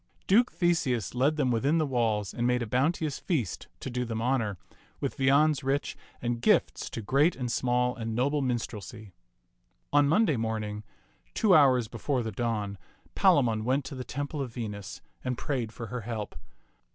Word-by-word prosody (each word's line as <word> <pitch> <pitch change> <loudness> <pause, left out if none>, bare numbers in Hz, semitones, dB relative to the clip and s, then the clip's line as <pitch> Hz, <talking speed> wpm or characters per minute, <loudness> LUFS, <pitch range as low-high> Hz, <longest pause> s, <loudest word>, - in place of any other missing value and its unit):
Duke 235 +6 +4
Theseus 155 - 0
led 135 +5 +2
them 140 -5 +1
within 135 +7 +2
the 155 - +2
walls 115 -6 0
and 120 0 0
made 125 -1 +1
a - - -3
bounteous 140 +5 0
feast 125 - -2
to - - -4
do 125 0 -1
them 115 -2 -3
honor, 115 -5 0 0.4
with - - -2
viands 140 +2 +4
rich 135 +2 -1 0.3
and 120 -1 -1
gifts - - +2
to 115 - -6
great 140 - +3
and 125 -2 -3
small 125 0 +1
and 115 -2 -4
noble 140 +4 +1
minstrelsy. 115 -4 -4 0.8
On 145 -1 +5
Monday 165 - +3
morning, 110 -2 -3 0.5
two 210 -4 +4
hours 130 -7 +5
before 125 +3 -2
the 110 - -3
dawn, 105 -3 -2 0.3
Palamon 115 -6 +3
went 130 +4 0
to 135 - -7
the 130 -1 -5
temple 145 +3 -4
of 130 -3 -4
Venus 105 -4 -6 0.2
and 125 -1 -2
prayed 125 -7 -2
for 115 - -7
her 125 - -3
help. 110 -2 -5
125 Hz, 170 wpm, -28 LUFS, 115-140 Hz, 0.8 s, On